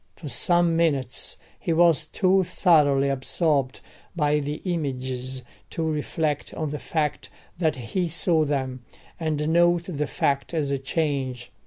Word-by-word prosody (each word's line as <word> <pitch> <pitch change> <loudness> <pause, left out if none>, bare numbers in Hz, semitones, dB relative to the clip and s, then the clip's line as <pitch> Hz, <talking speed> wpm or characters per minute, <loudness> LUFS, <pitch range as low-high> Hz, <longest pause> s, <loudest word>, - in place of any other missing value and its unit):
For 150 - -8
some 175 +6 +2
minutes 140 -7 0 0.2
he - - -2
was 165 -2 +4
too 190 +1 +3
thoroughly 150 -6 +3
absorbed 140 0 0 0.3
by 150 -2 +2
the 150 +1 -3
images 130 -6 -2 0.3
to 165 - -3
reflect 155 -1 -2
on 155 -2 -2
the 150 - -4
fact 150 -3 -2 0.3
that 160 -3 +2
he 130 +9 -2
saw 165 0 +2
them, 130 -4 -2 0.4
and 155 -2 -1
note 175 +1 +4
the 150 -5 -3
fact 140 +4 -1
as 145 -3 0
a 140 - 0
change. 135 -4 -2
150 Hz, 140 wpm, -25 LUFS, 135-165 Hz, 0.4 s, was